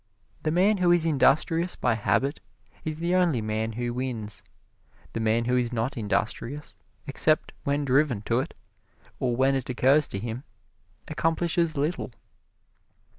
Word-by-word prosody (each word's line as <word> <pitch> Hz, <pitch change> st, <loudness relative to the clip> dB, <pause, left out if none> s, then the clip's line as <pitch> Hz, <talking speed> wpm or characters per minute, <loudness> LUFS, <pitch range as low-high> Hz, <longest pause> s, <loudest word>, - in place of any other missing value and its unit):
The 155 Hz, -, 0 dB
man 190 Hz, +6 st, +3 dB
who 180 Hz, -2 st, +2 dB
is 175 Hz, -2 st, +4 dB
industrious 165 Hz, +3 st, +2 dB
by 120 Hz, -, +1 dB
habit 135 Hz, +6 st, 0 dB, 0.4 s
is 155 Hz, -1 st, -3 dB
the 170 Hz, +2 st, -1 dB
only 175 Hz, -8 st, +3 dB
man 110 Hz, +1 st, -2 dB
who 120 Hz, +1 st, -3 dB
wins. 120 Hz, -5 st, -4 dB, 0.7 s
The -, -, -2 dB
man 115 Hz, +1 st, +1 dB
who 125 Hz, +1 st, +1 dB
is 125 Hz, -1 st, +1 dB
not 120 Hz, +3 st, -1 dB
industrious 115 Hz, +6 st, -2 dB, 0.3 s
except 155 Hz, +2 st, +1 dB
when 140 Hz, +1 st, 0 dB
driven 130 Hz, -5 st, +2 dB
to 115 Hz, +3 st, +1 dB
it, 140 Hz, -, -4 dB, 0.6 s
or 125 Hz, -2 st, 0 dB
when 135 Hz, +2 st, +3 dB
it 135 Hz, -2 st, -2 dB
occurs 135 Hz, +4 st, +4 dB
to -, -, -5 dB
him, 115 Hz, +5 st, -5 dB, 0.6 s
accomplishes 165 Hz, 0 st, 0 dB
little. 150 Hz, +2 st, -1 dB
135 Hz, 145 wpm, -26 LUFS, 115-155 Hz, 0.7 s, is